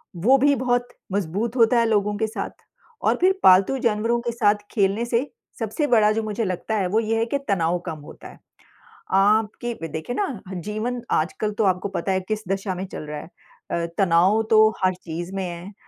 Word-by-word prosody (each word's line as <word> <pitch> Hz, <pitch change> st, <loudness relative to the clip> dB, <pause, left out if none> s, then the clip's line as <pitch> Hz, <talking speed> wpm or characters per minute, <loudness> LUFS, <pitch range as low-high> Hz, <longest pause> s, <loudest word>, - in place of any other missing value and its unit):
वो 230 Hz, +11 st, +4 dB
भी 285 Hz, +2 st, +4 dB
बहुत 245 Hz, -1 st, 0 dB, 0.3 s
मज़बूत 200 Hz, +5 st, -2 dB
होता 230 Hz, +1 st, +5 dB
है 230 Hz, -, +3 dB
लोगों 210 Hz, -1 st, +1 dB
के 220 Hz, -, 0 dB
साथ 220 Hz, -, -6 dB, 0.4 s
और -, -, +2 dB
फिर 380 Hz, +1 st, +3 dB
पालतू 190 Hz, +8 st, +6 dB
जानवरों 230 Hz, +2 st, 0 dB
के 235 Hz, -1 st, -2 dB
साथ 215 Hz, -3 st, +3 dB, 0.2 s
खेलने 205 Hz, +2 st, +1 dB
से 240 Hz, +4 st, 0 dB, 0.3 s
सबसे 230 Hz, +7 st, -1 dB
बड़ा 215 Hz, -5 st, +4 dB
जो 220 Hz, +1 st, -1 dB
मुझे 215 Hz, +1 st, -2 dB
लगता 185 Hz, +4 st, -2 dB
है, 190 Hz, -3 st, 0 dB
वो 215 Hz, +5 st, +1 dB
ये 225 Hz, 0 st, 0 dB
है 225 Hz, -, +1 dB
कि 260 Hz, +5 st, -1 dB
तनाव 175 Hz, -2 st, +1 dB
कम 160 Hz, -2 st, -4 dB
होता 145 Hz, -, -12 dB
है। -, -, -15 dB, 0.8 s
आपकी 215 Hz, +4 st, +2 dB, 0.2 s
देखिए 160 Hz, +10 st, -5 dB
ना 410 Hz, -, +1 dB, 0.2 s
ह 190 Hz, -, -6 dB
जीवन 215 Hz, +5 st, -3 dB
आजकल 210 Hz, +7 st, 0 dB
तो 220 Hz, -, +3 dB
आपको 185 Hz, 0 st, +1 dB
पता 190 Hz, +1 st, -2 dB
है 190 Hz, -, +1 dB
किस 215 Hz, 0 st, -2 dB
दिशा 195 Hz, 0 st, -2 dB
में 185 Hz, -, -4 dB
चल -, -, -7 dB
रहा 150 Hz, 0 st, -5 dB
है। -, -, -11 dB, 0.4 s
अ, 170 Hz, 0 st, -1 dB
तनाव 190 Hz, +3 st, +4 dB
तो 220 Hz, -1 st, +7 dB, 0.2 s
हर 185 Hz, 0 st, +3 dB
चीज़ 175 Hz, 0 st, -7 dB
में 190 Hz, -, -2 dB
है 175 Hz, +2 st, -7 dB
210 Hz, 205 wpm, -23 LUFS, 185-230 Hz, 0.8 s, तो